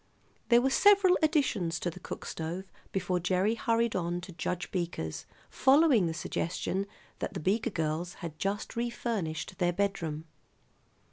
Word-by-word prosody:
There 240 0 +6
were 265 - +2
several 400 +1 +6
additions 250 - +1
to 175 - -1
the 180 - -11
cook - - -7
stove 170 +4 -4 0.3
before 180 -1 0
Gerry 185 +4 +2
hurried 230 0 +1
on 175 -1 -1
to 180 - -9
Judge 175 +1 -3
Beaker's, 170 - -3 0.2
following 265 - +4
the 165 - -2
suggestion 185 +4 -2 0.3
that - - -4
the - - -2
Beaker 210 +8 +1
girls 165 -1 -2
had 160 -3 -8
just 200 +3 -2
refurnished 225 -7 -3
their 175 -1 +3
bedroom. 170 -5 -1
185 Hz, 145 wpm, -30 LUFS, 170-230 Hz, 0.3 s, There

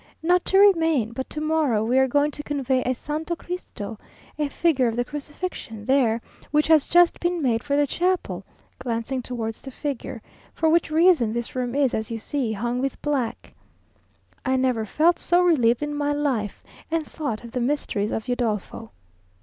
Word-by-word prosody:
"Not 355 +2 +3
to 385 - +3
remain. 325 - +4
But 260 +3 -5
to 300 - -5
morrow 305 -8 +1
we 250 +3 +3
are 265 - +4
going 290 +3 +2
to 295 - -6
convey 270 -3 0
a 255 - 0
Santo 310 +6 -3
Cristo 230 - -7 0.4
(a 295 -1 0
figure 280 -4 +2
of 225 - -1
the 245 0 0
Crucifixion) 295 - -6
there, 240 -4 +2 0.3
which 300 +1 +3
has 315 -3 +5
just 350 0 +5
been 350 0 0
made 240 -6 +1
for 280 +1 -1
the 290 0 +4
chapel;" 360 +5 -1 0.4
glancing 240 +2 -2
towards 230 -3 -5
the 270 - -8
figure; 265 -4 -5 0.3
"for 320 - +2
which 335 +1 +3
reason 315 -8 +4
this 235 0 -3
room 250 0 -2
is, 280 -3 +2
as 220 0 -2
you 230 - -3
see, 250 0 -2
hung 240 +4 -2
with 270 -1 -2
black." 275 -6 -2 0.9
I 260 0 +1
never 255 -4 +1
felt 335 - +3
so 355 +1 +3
relieved 250 -7 +3
in 295 0 -3
my 290 0 0
life, 265 -8 -2 0.3
and 325 -1 0
thought 280 -10 -4
of 235 - -9
the 250 - -2
Mysteries 240 -6 -1
of 220 - -3
Udolpho. 225 - -2
270 Hz, 180 wpm, -24 LUFS, 235-310 Hz, 0.9 s, has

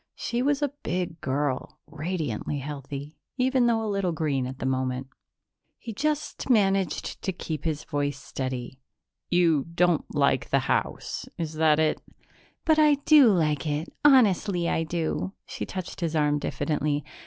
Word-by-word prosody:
She 240 +1 -2
was 285 +2 +1
a 285 -1 -1
big 175 -3 -3
girl, 135 0 -2
radiantly 155 - -3
healthy, 140 +1 -7 0.2
even 255 -1 +3
though 225 -1 +2
a - - -2
little 195 -3 0
green 140 -5 -1
at 130 0 -7
the - - -5
moment. 130 0 -1 0.7
He 230 - -7
just 300 +4 -2
managed 195 - +1
to 190 - -1
keep 160 -4 -5
his 155 -2 -1
voice 145 -2 -2
steady. 130 0 -5 0.5
"You 165 -5 +3
don't 175 -2 +3
like - - +2
the - - +3
house - - -2
is 160 -2 -3
that 155 -1 +3
it? 155 -1 +1 0.6
"But 315 -1 +4
I 300 -1 +6
do 300 -5 +8
like 155 -4 +1
it. 150 +2 -2
Honestly 205 -10 +4
I 165 - +1
do." 170 +3 -2
She - - -6
touched 185 -1 -6
his 165 -1 -1
arm 150 -1 +2
diffidently. 150 0 -1
160 Hz, 155 wpm, -26 LUFS, 145-200 Hz, 0.7 s, do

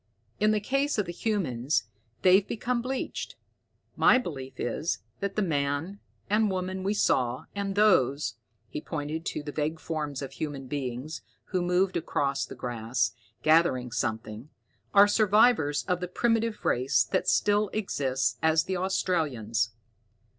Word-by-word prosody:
In 215 - +4
the 215 0 +3
case 275 +6 0
of 210 - +1
the 175 - -5
humans, 155 - 0 0.4
they've 190 +2 +6
become 240 +2 -1
bleached. 260 +2 -4 0.6
My - - +6
belief 135 - -6
is 135 +8 -1 0.2
that 200 0 -3
that 215 - +1
man 150 +4 -1 0.3
and 210 +1 +2
woman 185 0 -3
we 200 +3 0
saw, 125 -9 +1
and 200 -1 -3
those" 155 - +3 0.3
he 150 - -5
pointed 155 +1 -4
to 150 - -3
the 145 - -5
vague 155 +2 -2
forms 150 -4 -4
of 135 - -6
human 145 -3 -5
beings, 130 +2 -4 0.3
who 185 -2 0
moved 180 +2 +1
across 140 -4 -1
the - - -9
grass, 120 0 -1 0.3
gathering 155 -6 +3
something 110 +3 -3 0.4
"are 200 0 +7
survivors 210 -7 +4
of 180 -2 -1
the 180 - -3
primitive 225 +3 0
race 130 +2 +3
that 185 - -1
still 205 0 +3
exists 135 -11 -1
as 160 0 +3
the 185 +1 -2
Australians. 140 - 0
160 Hz, 145 wpm, -28 LUFS, 135-200 Hz, 0.6 s, are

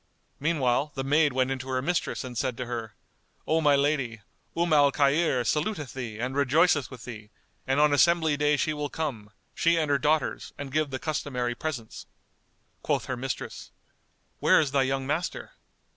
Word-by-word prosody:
Meanwhile, 145 -2 +1
the 135 - -2
maid 145 +2 +3
went 130 +1 0
in 135 - -2
to 130 +1 -8
her 130 0 0
mistress 175 -1 -1
and 125 -1 -7
said 125 0 -1
to 125 - -3
her, 115 -3 -5 0.5
"O 160 +1 +2
my 145 -2 +5
lady, 140 -6 0 0.4
Umm 170 -1 +2
al 145 -2 +5
Khayr 140 -2 +2
saluteth 150 - -1
thee 120 -5 -6
and 125 +3 -3
rejoiceth 145 +1 +3
with 125 -3 -11
thee 110 -3 -9 0.4
and 135 +2 +2
on 150 -1 +4
assembly 160 0 +4
day 150 0 +2
she 155 - 0
will 150 -1 -3
come, 130 -11 -4 0.2
she 170 0 +2
and 155 -3 0
her 140 - +3
daughters, 150 +2 0
and 140 -2 -6
give 155 +1 0
the 130 - -3
customary 130 -5 -2
presents." 120 -4 -6 0.7
Quoth - - 0
her 130 - -3
mistress, 130 +1 -5 0.7
"Where - - +5
is 150 -4 0
thy 140 0 +3
young 135 0 0
master?" 155 +6 -3
140 Hz, 180 wpm, -27 LUFS, 130-155 Hz, 0.7 s, my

